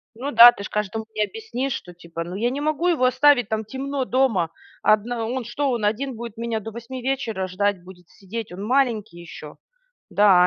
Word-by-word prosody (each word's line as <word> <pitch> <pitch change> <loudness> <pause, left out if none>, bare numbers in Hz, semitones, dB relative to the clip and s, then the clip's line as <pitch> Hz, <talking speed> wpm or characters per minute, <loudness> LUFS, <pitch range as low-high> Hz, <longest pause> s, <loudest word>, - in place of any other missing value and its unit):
Ну 270 +5 -4
да, 235 +1 +10
ты 200 - -9
ж - - -6
каждому 210 +1 -3
не 215 - +2
объяснишь, 275 - -4
что, 180 - -7
типа: 170 -1 -7
"Ну, 175 +2 -7
я 230 +5 +1
не 270 +3 -3
могу 310 +3 0
его 320 -8 +3
оставить, 255 -1 +4
там 220 0 -1
темно 270 +4 -3
дома. 250 -11 +2 0.3
Одна 225 +2 +2
он 245 +1 -3
что, 275 +4 -1
он 235 -4 -1
один 245 +5 -1
будет 230 -1 -8
меня 230 -1 -2
до 225 +2 -8
8 235 +3 -7
вечера 240 -7 -2
ждать, 195 0 0
будет 180 -1 -15
сидеть? 210 +2 -7
Он 180 +2 -7
маленький 225 -6 0
ещё?" 155 -3 -10 0.5
Да, 190 -3 +5
225 Hz, 200 wpm, -23 LUFS, 200-260 Hz, 0.5 s, да